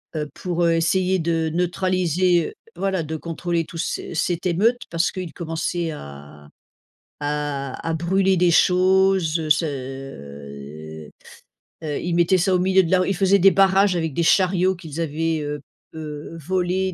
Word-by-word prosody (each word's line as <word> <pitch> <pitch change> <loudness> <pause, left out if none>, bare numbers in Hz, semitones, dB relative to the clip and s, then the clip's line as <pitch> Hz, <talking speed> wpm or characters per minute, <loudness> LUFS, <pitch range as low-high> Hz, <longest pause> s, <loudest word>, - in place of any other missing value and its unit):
heu, 150 -1 -3
pour, 175 +1 -2
heu, 170 -1 +3
essayer 185 +3 +1
de 165 -1 0
neutraliser 180 0 +1
heu, - - -13 0.2
voilà, 190 -3 -1
de 160 +1 -5
contrôler 170 +1 -2
tous 165 - -10
ces - - -3
cette 175 +2 -1
émeute 215 +8 +2
parce 170 +1 0
qu'ils 185 -4 -6
commençaient 165 0 -3
à 70 - -11 0.7
à 145 -1 -3
à 165 - 0
brûler 190 +3 +2
des 175 0 +4
choses 180 -3 +3
ce, 150 +2 +3
heu 80 - -8 0.7
heu 155 - -4
heu, 145 - -2
ils 175 - -2
mettaient 175 +2 +4
ça, 185 +1 +2
au - - +2
milieu 190 +1 +4
de 165 - -3
la 185 - +5
rue, 185 - 0
ils 195 - 0
faisaient 195 +2 +4
des 195 +2 +6
barrages 195 0 +4
avec 160 -3 -2
des 170 - +1
chariots 185 +1 +3
qu'ils 165 -3 -8
avaient, 160 0 -1
heu 145 -1 -4 0.3
heu, 155 +1 -7
volé, 185 +3 -1
170 Hz, 165 wpm, -22 LUFS, 150-185 Hz, 0.7 s, des